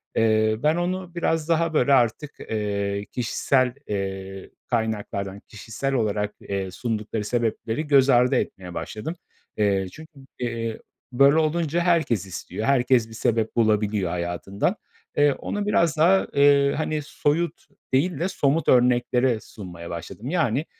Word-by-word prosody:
Eee, 110 -1 +3
ben 155 +1 +3
onu 180 0 -3
biraz 165 -1 0
daha 165 0 +2
böyle 140 -1 +3
artık, 130 +4 +2
eee, 100 -1 -2
kişisel, 125 +1 +1
eee, 95 -1 -4 0.2
kaynaklardan, 105 -4 -2
kişisel 115 +6 -4
olarak, 105 -3 -1
eee, 95 -1 -4
sundukları 110 0 -3
sebepleri 115 +4 -2
göz 140 -2 +5
ardı 125 +1 +4
etmeye 90 -6 -3
başladım. 135 +11 -5 0.4
Eee, 100 -2 +1
çünkü, 155 - -13 0.3
eee, 115 -2 -3 0.3
böyle 140 +4 +5
olunca 160 +1 +1
herkes 160 - +1
istiyor. 95 +3 -6
Herkes 125 -3 +3
bir - - -12
sebep 110 0 0
bulabiliyor 105 -4 +1
hayatından. 90 +3 -2 0.4
Eee, 145 -1 +5
onu 205 +8 -4
biraz 170 -6 +2
daha, 180 +5 +4
eee, 140 0 +5
hani, 155 0 -1
soyut 150 +3 -1 0.3
değil 155 +4 +1
de 175 - 0
somut 150 +1 0
örneklere 125 -1 +3
sunmaya 90 -7 -10
başladım. 85 - -7
Yani, 155 -5 +1
120 Hz, 135 wpm, -24 LUFS, 105-150 Hz, 0.4 s, göz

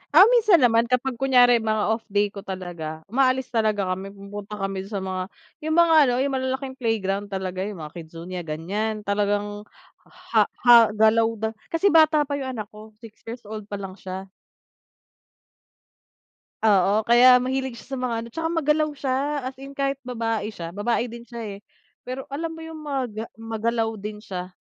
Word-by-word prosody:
Ah, 365 - +11
minsan 440 -6 +5
naman 230 0 +4
kapag 250 0 -1
kunyari 245 -3 +5
mga 215 -1 0
off 225 0 -1
day 205 0 +1
ko 200 - -8
talaga 175 -5 -6
umaalis 260 0 +2
talaga 215 -5 +1
kami, 190 +1 -4
pumupunta 200 +1 -8
kami 195 -1 -4
dun 215 - -16
sa 190 - -2
mga 185 -1 -3 0.4
yung 315 - +1
mga 340 -1 +5
ano, 245 - +2
yung 280 - -1
malalaking 260 0 -3
playground 205 -4 -1
talaga, 190 -2 -4
yung 190 -7 -7
mga 150 - -8
KidZania, 170 +2 -7
ganyan. 210 +8 -3
Talagang 205 +1 -1 0.4
ha - - 0 0.2
ha 240 -1 +9 0.2
galaw 220 +1 +4
da 220 +1 -2 0.2
kasi 355 +4 +2
bata 310 -2 +5
pa 285 0 -3
yung 260 -2 -4
anak 215 0 -6
ko, 215 0 -13
6 225 -2 -13
years 235 +1 -7
old 215 -1 -8
pa 205 - -5
lang 195 -1 -7
siya. 190 +1 -7 2.3
Oo. 205 +1 +4
Kaya 250 +2 +7
mahilig 260 -1 -2
siya 255 +4 -11
sa 270 - -2
mga 250 -2 -1
ano, 235 - -9
tsaka 325 0 -2
magalaw 310 -2 +1
siya. 275 +1 -1
As 260 - -4
in 275 +1 -10
kahit 275 0 -1
babae 225 -4 -2
siya, 170 -5 -7
babae 230 +4 0
din 235 0 -8
siya, 235 0 -9 0.2
eh. - - -15 0.4
Pero 255 +1 -6
alam 330 +3 -2
mo 325 - -10
yung 320 -1 -9
maga 255 -7 -3
magalaw 225 0 -1
din 210 +1 -6
siya. 185 -4 -6
225 Hz, 180 wpm, -24 LUFS, 200-260 Hz, 2.3 s, Ah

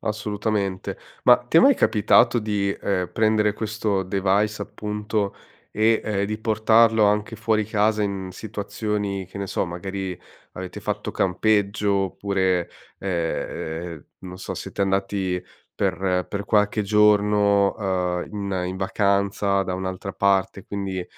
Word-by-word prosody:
assolutamente. 105 -2 -2 0.3
Ma 125 - +8
ti 125 +6 -1
è - - +9
mai 275 -1 +6
capitato 110 - +4
di, 105 -3 -1
ehm, 90 -3 -1
prendere 110 -1 +2
questo 105 -2 -1
device 100 +3 0
appunto, 105 -1 -3 0.4
e, 110 +1 +2
uhm, 100 -2 -1
di 105 +1 -3
portarlo 110 0 +4
anche 105 +2 +1
fuori 110 -1 +1
casa 105 0 +1
in 100 -2 -3
situazioni, 105 -1 -4
che 95 +2 -9
ne 100 - -3
so, - - 0
magari 95 +1 -5 0.3
avete 90 0 -7
fatto - - -3
campeggio 100 +1 +1
oppure, 95 -2 0 0.3
ehm, 85 -2 -3 0.2
non 90 0 -9
so, - - -5
siete 100 - -4
andati 95 -1 -1 0.3
per 90 -1 0
per 100 0 -4
qualche 105 0 +2
giorno, 105 -1 +4
uhm, 90 -3 -1
in 100 -3 -2
in 95 - -4
vacanza 100 0 +1
da 90 -1 -3
un'altra 95 +1 -4
parte, 95 -1 +1
quindi, 95 -3 -4
100 Hz, 130 wpm, -23 LUFS, 95-105 Hz, 0.4 s, è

